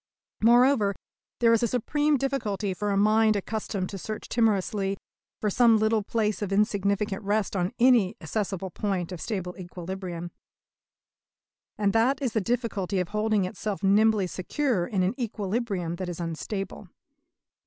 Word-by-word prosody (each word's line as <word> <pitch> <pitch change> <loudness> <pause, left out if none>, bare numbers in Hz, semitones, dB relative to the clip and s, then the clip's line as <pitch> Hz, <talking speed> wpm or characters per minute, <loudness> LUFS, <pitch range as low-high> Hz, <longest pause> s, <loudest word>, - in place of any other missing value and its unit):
Moreover, 235 -3 +4 0.5
there 230 -1 +5
is 230 - +3
a 235 - +2
supreme 290 +6 +1
difficulty 220 -8 -1
for 205 +3 -3
a 200 - +1
mind 215 +1 +4
accustomed 200 -2 -3
to 195 - -6
search 215 +3 -6
timorously 200 -3 +1 0.4
for 210 - 0
some 230 0 +5
little 220 0 +2
place 215 0 -1
of 200 -2 -3
insignificant 200 -1 +1
rest 205 0 0
on 180 -1 0
any 235 -5 +4
accessible 195 -3 -3
point 190 -4 -2
of 180 - -6
stable 185 -5 -4
equilibrium; 175 -1 -6 1.5
and 205 -1 +1
that 240 +5 +3
is 260 -5 -2
the 220 - +1
difficulty 210 -4 -1
of 180 -1 -2
holding 215 -2 +1
itself 200 +2 -4
nimbly 210 +1 +4
secure 190 +2 -1
in 190 -3 0
an 185 - +1
equilibrium 205 -6 -2
that 185 -1 -4
is 175 - -6
unstable. 175 +4 -5
205 Hz, 145 wpm, -27 LUFS, 190-225 Hz, 1.5 s, there